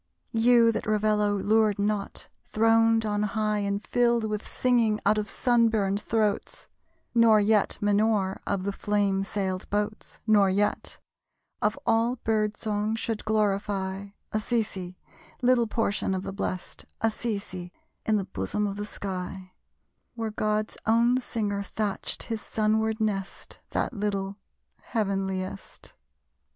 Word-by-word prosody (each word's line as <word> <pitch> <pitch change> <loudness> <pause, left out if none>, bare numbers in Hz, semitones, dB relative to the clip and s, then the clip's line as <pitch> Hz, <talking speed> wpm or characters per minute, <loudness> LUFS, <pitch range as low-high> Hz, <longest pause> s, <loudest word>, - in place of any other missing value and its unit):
You, 230 0 +5
that - - -4
Ravello 210 -1 +2
lured 215 +1 +3
not, 205 0 -2 0.2
throned 225 0 +3
on 205 -1 0
high 210 0 0
And 200 0 -1
filled 235 -1 +2
with 210 -1 -4
singing 235 -4 +2
out 215 - +4
of 210 - -3
sun 240 -2 +3
burned 200 -2 0
throats! 215 -1 -1 0.5
Nor 230 -2 +6
yet 210 0 +2
Minore 205 -2 +2
of 195 -2 -1
the 200 - -1
flame 200 -1 +1
sailed 190 -2 -3
boats; 210 +1 -3
Nor 205 -3 +5
yet 205 +2 0 0.6
of 210 +1 +1
all 230 +2 +2
bird 215 -3 0
song 210 0 -1
should 225 -1 -3
glorify 200 -2 0 0.2
Assisi, 210 -5 -2 0.5
Little 245 -2 +4
Portion 210 -3 0
of 185 - -3
the 195 - -5
blest, 185 -2 -4 0.2
Assisi, 200 -5 -2 0.3
in 220 - +2
the 195 - -2
bosom 190 - -2
of 200 0 -3
the 205 0 -4
sky, 185 -2 -6 0.6
Where 225 -2 -3
God's 215 0 -1
own 235 +3 +4
singer 205 -5 -2
thatched 205 0 -3
his 225 -2 -4
sunward 220 +1 0
nest; 200 -3 -3
That - - -1
little, 200 -2 -2 0.4
heavenliest! 195 -3 -3
210 Hz, 130 wpm, -27 LUFS, 200-225 Hz, 0.6 s, Nor